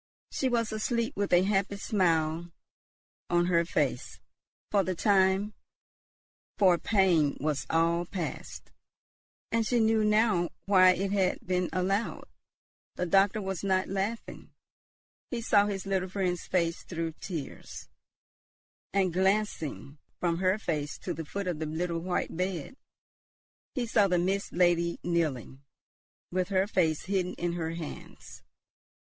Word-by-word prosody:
She 265 - 0
was 230 -2 0
asleep, 230 +3 -1
with 200 0 -1
a 175 0 +5
happy 200 0 0
smile 170 -4 0 0.8
on 175 0 +3
her 170 -1 +3
face; 170 - -2 0.5
for 200 -2 +3
the 185 0 -2
time 195 +2 +2 1.0
for 185 -4 +4
pain 180 -9 +2
was 145 -3 -2
all 170 +1 +2
past, 175 -5 -6 0.8
and 230 0 +2
she 240 +2 +1
knew 220 -1 +3
now 210 -5 +3 0.2
why 185 -2 +6
it 195 +2 -2
had 190 -2 0
been 180 -1 0
allowed. 195 +4 -1 0.7
The 180 - -1
doctor 195 +3 +3
was 190 -1 -4
not 190 -1 +1
laughing; 200 +4 -4 0.8
he 240 - -3
saw 205 -3 +3
his 195 -2 -4
little 190 -1 -1
friend's 180 -2 -2
face 170 -2 0
through 165 -2 -4
tears; 160 -7 -7 1.1
and, 190 -3 +2
glancing 185 -7 -1 0.2
from 170 -2 0
her 185 +2 +2
face 155 -8 -3
to 180 - -4
the 160 0 -6
foot 200 +6 -4
of 175 -4 -2
the 160 - -3
little 165 +2 -2
white 175 0 -2
bed, 180 - -3 1.0
he 250 - 0
saw 210 -3 +3
the 180 -2 +2
Mist 190 +3 -1
Lady 170 -1 +2
kneeling, 150 -7 -1 0.7
with 185 +1 -1
her 190 -1 +2
face 165 -7 +1
hidden 185 -2 -1
in 175 0 -2
her 165 -1 -3
hands. 165 -3 -9
185 Hz, 135 wpm, -29 LUFS, 170-200 Hz, 1.1 s, why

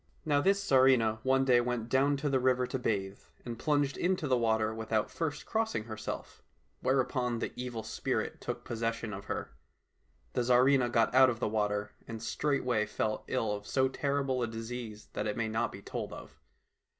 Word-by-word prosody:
Now 145 -2 +3
this 195 +5 +3
Tsarivna 130 -5 +4
one 135 +2 +3
day 125 -2 +5
went 120 -2 -2
down 140 +3 +3
to 145 +2 -2
the 135 -2 +2
river 125 0 +2
to 130 +1 -3
bathe, 100 -5 -1 0.3
and 120 -2 -5
plunged 145 -2 +1
into 180 -4 0
the 130 - +3
water 110 -2 +1
without 110 -1 -1
first 150 -3 -3
crossing 220 - -1
herself, 110 -1 -6 0.4
whereupon 130 -2 +1
the - - -3
Evil 125 -3 -4
Spirit 110 - -2
took 120 0 -5
posses 115 -1 -1
sion 110 -2 -6
of 100 0 -7
her. - - -4 0.8
The - - +1
Tsarivna 125 +1 +4
got 115 -1 +3
out 130 0 +7
of 120 -2 -3
the - - 0
water, 105 -1 -1 0.2
and 115 -1 -6
straightway 125 -6 0
fell 110 0 -2
ill 115 -5 0
of 105 0 -5
so 130 -1 +2
terrible 140 -1 -1
a 120 - +1
disease 115 -1 -6
that 105 - -2
it 105 - -2
may 115 -1 0
not 115 +2 0
be 100 - -10
told - - -5
of. - - -11
120 Hz, 185 wpm, -31 LUFS, 110-130 Hz, 0.8 s, out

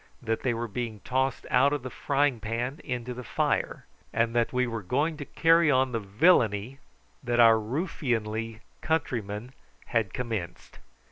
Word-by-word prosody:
that 115 -2 -2
they 125 - +1
were 120 0 -2
being 110 0 -4
tossed 130 +1 -1
out 135 +3 +5
of 145 -3 -2
the 130 - -5
frying 140 -3 +1
pan 120 +6 -3
into 125 0 -4
the 125 +1 -7
fire, - - -1 0.3
and 115 0 +1
that 120 -1 +2
we 125 0 +1
were 115 -2 -4
going 145 - 0
to 145 -1 -7
carry 165 +1 +4
on 130 -2 +3
the 115 - -1
villainy 110 - +2 0.4
that 120 -2 -1
our 115 -1 +7
ruffianly 115 - -2 0.2
countrymen 120 -7 -2 0.4
had 115 -5 +1
commenced. 110 -8 -5
120 Hz, 155 wpm, -27 LUFS, 115-135 Hz, 0.4 s, our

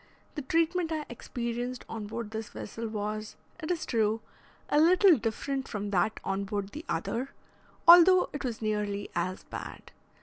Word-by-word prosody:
The 300 - -4
treatment 330 +4 +1
I 310 -2 -2
experienced 240 +1 -4
on 220 -2 -6
board 225 0 -5
this 220 -1 -5
vessel 225 +3 -6
was, 215 0 -4 0.2
it 310 - -5
is 350 -2 -1
true, 220 -1 +1 0.5
a 295 - +3
little 360 +3 +6
different 265 +3 -3
from 205 -2 -4
that 205 +3 +1
on 195 +1 -1
board 200 -1 -3
the 300 +8 -8
other, 255 +4 -2 0.5
although 355 +2 +9
it 290 - -4
was 235 -3 -4
nearly 205 -1 -2
as 185 +2 -2
bad. - - -8
230 Hz, 160 wpm, -29 LUFS, 210-300 Hz, 0.5 s, although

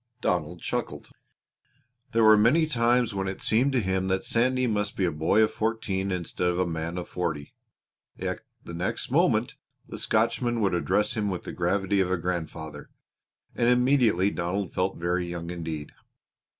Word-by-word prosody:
Donald 85 -4 -1
chuckled. - - -4 1.0
There 115 0 +3
were 110 0 +8
many 120 +10 +4
times 120 -4 +2
when 95 -1 -2
it 95 - -4
seemed 125 +6 +3
to 130 - +3
him 95 -2 -1
that 95 0 0
Sandy 130 +2 +2
must 105 -3 -1
be 95 - +2
a 85 - +1
boy 80 +8 +3
of 110 - +1
fourteen 110 -4 -2
instead 90 0 -2
of 90 0 0
a 90 - +2
man 85 0 -4
of 90 - -4
forty; 80 -5 -4 0.6
yet - - -3 0.2
the 85 - -9
next 85 +2 -3
moment - - +2 0.3
the - - -7
Scotchman 115 +2 +1
would 100 -4 +1
address 100 +4 +1
him 105 -2 0
with 90 -2 -4
the - - -7
gravity 95 +3 0
of 95 -1 +2
a 95 - +2
grandfather, 80 -3 -5 0.6
and 120 0 +2
immediately 125 -6 +3
Donald 90 +2 -3
felt 95 +1 -1
very 90 +1 -1
young 85 0 -5
indeed. 80 -4 -5
95 Hz, 170 wpm, -27 LUFS, 85-110 Hz, 1.0 s, were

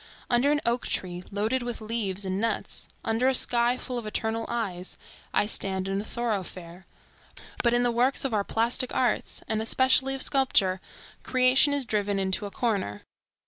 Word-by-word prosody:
Under 245 +4 +3
an 295 0 +1
oak 235 +1 0
tree 180 -1 -2
loaded 215 +6 -1
with 240 -1 -4
leaves 215 -3 -3
and 190 +1 -2
nuts, 230 - -2 0.2
under 225 +3 +1
a 265 - +4
sky 240 0 +3
full 250 -1 -4
of 220 - -7
eternal 225 +1 -2
eyes, 195 -6 -4 0.3
I - - +2
stand 190 -3 0
in 195 +1 -1
a - - -7
thoroughfare; 190 -6 -5 0.7
but 240 0 +2
in 240 - +2
the 245 - +2
works 250 +4 +2
of 265 - -1
our 205 -2 +1
plastic 235 +4 +1
arts 250 - 0
and 220 0 -1
especially 260 +3 +3
of 270 - +2
sculpture, 200 -9 +2 0.4
creation 255 +3 +4
is 285 -2 0
driven 205 -2 -1
into 190 +1 0
a - - -10
corner. 195 - -2
225 Hz, 175 wpm, -27 LUFS, 195-250 Hz, 0.7 s, a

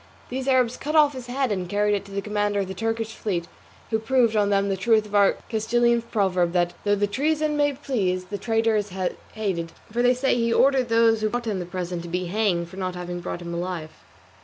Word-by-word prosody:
These 260 +1 -4
Arabs 255 -3 +3
cut 300 +3 -3
off 295 -2 +5
his 255 -2 -8
head 260 -1 -1
and 185 -3 -2
carried 205 +1 +2
it 200 - -1
to 200 - -13
the 200 0 -3
commander 205 -1 0
of 195 - -3
the 190 - -5
Turkish 225 +2 -2
fleet, 175 -5 -3 0.4
who 220 - +2
proved 235 -1 +2
on 205 -1 +3
them 200 0 +2
the 195 - 0
truth 215 +3 +2
of 210 - -12
our 200 -1 +5
Castilian 235 +1 +2
proverb, 190 -6 0
that 175 -1 +1
"though 205 0 +3
the 205 0 +1
treason 300 +7 0
may 290 -1 +2
please, 200 -10 -1
the 200 +2 -5
traitor 225 -1 +1
is 205 -2 -1 0.4
hated;" 185 -6 -2 0.2
for 235 +2 0
they 250 +1 +4
say 265 +2 +1
he 235 -1 +1
ordered 260 0 +3
those 225 -1 +4
who 215 - +1
brought 240 +1 -3
him 210 -4 -1
the 175 - -5
present 180 -1 -4
to 170 - -8
be 180 +1 -2
hanged 180 -2 0
for 185 +3 -12
not 185 -1 -3
having 175 0 -5
brought 175 0 -5
him 170 0 -5
alive. 170 -2 -4
210 Hz, 235 wpm, -24 LUFS, 185-235 Hz, 0.4 s, off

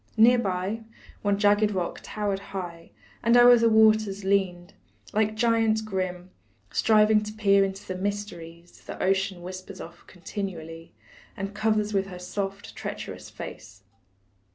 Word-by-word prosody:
Near 240 +3 +6
by, 195 +1 -2 0.4
one 205 -1 +1
jagged 205 +1 +4
rock 185 -4 -3
towered 205 -2 -3
high, 175 -4 -7 0.3
And 235 +1 +4
o'er 245 0 +9
the 230 0 +4
waters 215 -2 +4
leaned, 190 -3 0 0.4
like 215 0 +1
giant 225 -1 +2
grim, 185 -3 -4 0.4
Striving 215 -1 +4
to 210 0 -6
peer 200 -2 +3
into 195 0 -4
the 185 - -3
mysteries 180 -4 -6
The - - -8
ocean 190 -1 0
whispers 185 +1 -8
of - - -11
continually, 165 -3 -7 0.4
And 195 +1 -4
covers 215 0 0
with 195 -1 +1
her 180 -2 -8
soft, 195 +2 -5
treacherous - - -7
face. - - -10
200 Hz, 135 wpm, -26 LUFS, 185-215 Hz, 0.4 s, o'er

